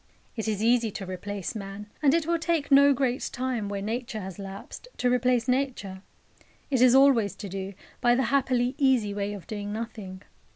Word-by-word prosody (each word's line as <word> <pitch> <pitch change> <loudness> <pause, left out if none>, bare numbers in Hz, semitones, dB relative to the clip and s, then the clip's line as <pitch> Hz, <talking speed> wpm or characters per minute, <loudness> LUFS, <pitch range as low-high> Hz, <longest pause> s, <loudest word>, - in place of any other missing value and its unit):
It 220 -2 -3
is 215 -1 -1
easy 235 -1 +3
to 195 - -5
replace 190 +1 -5
man, 200 -1 -7 0.2
and 290 0 +4
it 335 -2 +1
will 335 0 +1
take 325 -4 -1
no 280 +1 +7
great 260 -2 0
time, 245 -5 -2
where 200 -1 -4
Nature 225 0 -3
has 190 0 -8
lapsed, 195 - -9
to 245 0 +1
replace 250 -1 +2
Nature. 250 -8 -1 0.7
It 260 -3 +2
is 255 0 +6
always 265 -7 +5
to 205 - -7
do, 195 +1 -6 0.3
by 240 -1 +4
the 265 - +1
happily 255 -2 +2
easy 255 -7 +3
way 200 0 -2
of 200 -4 -9
doing 205 -1 -5
nothing. 210 -4 -6
230 Hz, 190 wpm, -27 LUFS, 200-260 Hz, 0.7 s, no